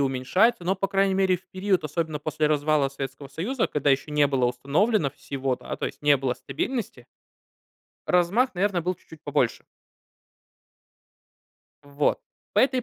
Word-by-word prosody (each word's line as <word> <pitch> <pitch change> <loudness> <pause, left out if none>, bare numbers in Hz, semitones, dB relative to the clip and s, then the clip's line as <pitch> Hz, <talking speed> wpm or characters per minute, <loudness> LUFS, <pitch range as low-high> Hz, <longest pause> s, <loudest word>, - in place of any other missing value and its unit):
уменьшается, 140 - +2
но, 185 +2 +2
по 195 +1 -2
крайней 195 -1 +2
мере, 190 -1 +3
в 180 - -20
период, 185 -3 0
особенно 155 0 -2
после 150 0 -1
развала 150 -1 +2
Советского 135 0 -7
Союза, 220 - -2
когда 145 -1 +1
ещё 135 +2 +1
не 150 -1 +4
было 135 -3 +1
установлено 140 - +1
всего, 135 -1 -3
да, - - -6
то - - -2
есть, - - -9
не 145 -1 +5
было 130 -2 -1
стабильности 220 - -4 1.0
размах, 190 +9 +2
наверно, 185 -1 0
был 180 +2 -1
чуть-чуть 160 -2 -16
побольше. - - 0 2.2
Вот. 145 +1 0 0.4
По - - +5
этой 260 -1 +2
155 Hz, 150 wpm, -25 LUFS, 140-195 Hz, 2.2 s, не